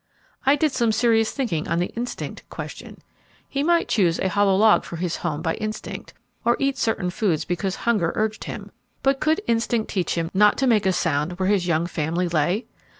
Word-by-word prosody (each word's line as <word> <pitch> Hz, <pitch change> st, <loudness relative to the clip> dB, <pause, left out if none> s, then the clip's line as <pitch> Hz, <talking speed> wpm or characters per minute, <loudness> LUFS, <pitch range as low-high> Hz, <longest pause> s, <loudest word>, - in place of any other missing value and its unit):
I 275 Hz, -, +6 dB
did 300 Hz, +1 st, +1 dB
some 235 Hz, -3 st, +1 dB
serious 225 Hz, -1 st, +2 dB
thinking 210 Hz, -, -2 dB
on 170 Hz, -, 0 dB
the 175 Hz, +1 st, -1 dB
'instinct' 240 Hz, +1 st, -5 dB
question. -, -, -8 dB, 0.4 s
He 280 Hz, -, -2 dB
might 340 Hz, +3 st, +2 dB
choose 175 Hz, -6 st, +2 dB
a 190 Hz, -, 0 dB
hollow 200 Hz, 0 st, +3 dB
log 215 Hz, +2 st, +5 dB
for -, -, -7 dB
his 170 Hz, 0 st, -2 dB
home 150 Hz, -, -3 dB
by 165 Hz, -, 0 dB
instinct, 215 Hz, 0 st, -6 dB, 0.3 s
or 235 Hz, +1 st, +3 dB
eat 275 Hz, 0 st, 0 dB
certain 180 Hz, -5 st, 0 dB
foods 180 Hz, -5 st, 0 dB
because 185 Hz, +2 st, -2 dB
hunger 205 Hz, -8 st, +1 dB
urged 215 Hz, 0 st, -1 dB
him, -, -, -7 dB, 0.3 s
but 270 Hz, 0 st, +2 dB
could 315 Hz, +5 st, +1 dB
instinct 230 Hz, -1 st, 0 dB
teach 185 Hz, -3 st, -1 dB
him 165 Hz, 0 st, -2 dB
not 210 Hz, +2 st, +5 dB
to 270 Hz, -, +1 dB
make 215 Hz, -6 st, +3 dB
a -, -, +4 dB
sound 165 Hz, -2 st, 0 dB
where 185 Hz, +1 st, -1 dB
his 195 Hz, -4 st, +2 dB
young 170 Hz, -1 st, +1 dB
family 170 Hz, +1 st, -1 dB
lay? 175 Hz, +7 st, 0 dB
205 Hz, 200 wpm, -23 LUFS, 175-235 Hz, 0.4 s, I